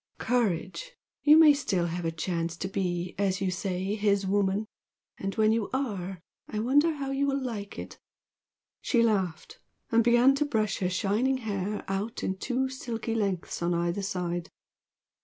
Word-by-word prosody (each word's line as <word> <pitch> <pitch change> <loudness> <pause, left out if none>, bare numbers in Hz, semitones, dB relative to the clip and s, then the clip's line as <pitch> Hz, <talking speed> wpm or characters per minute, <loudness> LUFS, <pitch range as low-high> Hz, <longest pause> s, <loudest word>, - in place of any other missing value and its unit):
Courage! 240 - -1 0.3
You 300 +1 +7
may 315 -2 +8
still 195 -11 0
have 170 0 -3
a 165 - 0
chance 170 0 -2
to 190 - -3
be, 180 -2 -2
as 195 -1 +1
you 190 -1 0
say, 185 +1 -2
'his 200 -2 +1
woman!' 200 +1 +1 0.5
And 195 0 -3
when 220 -1 +4
you 225 -2 0
are 195 -9 -2 0.3
I 215 - -5
wonder 290 +8 +3
how 275 -2 -4
you 275 +1 +1
will 275 0 +1
like 220 -6 -5
it!" - - -8 0.8
She 235 -3 +2
laughed, 190 -7 -1 0.3
and 230 0 +5
began 240 +3 +5
to 295 - +1
brush 215 -7 0
her 180 - 0
shining 210 +8 +1
hair 210 -3 -3
out 200 +5 -3
in 190 - -1
two 260 +6 -1
silky 235 -3 -4
lengths 195 -7 -2
on 170 0 +1
either 170 +3 0
side. 175 -3 -3
205 Hz, 165 wpm, -28 LUFS, 185-245 Hz, 0.8 s, may